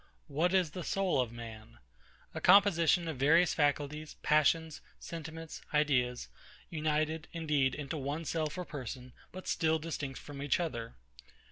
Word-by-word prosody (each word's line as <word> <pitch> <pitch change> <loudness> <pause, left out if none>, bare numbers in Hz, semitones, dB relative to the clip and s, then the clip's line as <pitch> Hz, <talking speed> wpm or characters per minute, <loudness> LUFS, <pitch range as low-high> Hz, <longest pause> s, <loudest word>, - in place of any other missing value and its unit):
What 160 +4 +1
is 185 -5 +2
the 180 - -5
soul 185 -5 +1
of 120 -3 -3
man? 115 -2 -10 0.6
A - - -5
composition 175 -4 +5
of 160 -4 -3
various 160 +6 +4
faculties, 150 +1 0
passions, 155 +1 +2 0.2
sentiments, 165 -1 -7
ideas; 125 -5 +2 0.4
united, 155 0 -1
indeed, 150 -6 +1
into 145 +1 -4
one 145 +4 -3
self 155 +1 -2
or 180 - -3
person, 130 -4 -7 0.2
but 185 0 -9
still 160 0 +2
distinct 150 -4 -5
from 140 -1 -9
each 145 +2 +1
other. 120 -10 -4
155 Hz, 140 wpm, -32 LUFS, 140-165 Hz, 0.6 s, composition